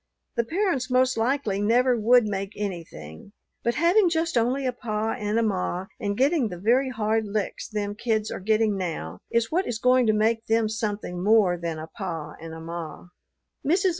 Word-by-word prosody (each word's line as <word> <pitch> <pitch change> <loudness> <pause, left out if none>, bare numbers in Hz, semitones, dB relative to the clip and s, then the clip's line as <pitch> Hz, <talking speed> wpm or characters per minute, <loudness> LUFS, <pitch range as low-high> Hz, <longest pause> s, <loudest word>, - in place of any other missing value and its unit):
The 235 - +2
parents 330 - -1
most 255 0 +3
likely 225 -4 0
never 245 +4 +3
would 240 +1 +4
make 200 -1 -3
anything; 170 - -7 0.3
but 235 - 0
having 355 +3 +4
just 330 -1 0
only 250 +4 +1
a 255 - 0
pa 220 -2 -2
and 210 +1 -2
a 230 - +3
ma 185 -3 -1
and 205 -3 -2
getting 275 -1 +3
the 180 -4 -6
very 245 +8 +2
hard 220 -2 0
licks 205 -1 -3
them 205 -2 -3
kids 220 0 -1
are - - -4
getting 215 +1 +2
now, 155 - -4
is 230 -1 +1
what 360 +4 +1
is 240 - -2
going 250 0 +3
to 215 - +4
make 225 +2 +1
them 225 0 +2
something 205 -5 -3
more 205 -4 +4
than 170 -2 -4
a 155 - -6
pa 165 -3 -6
and 165 0 -8
a 160 - -8
ma." 165 +1 -7
220 Hz, 185 wpm, -25 LUFS, 195-245 Hz, 0.3 s, would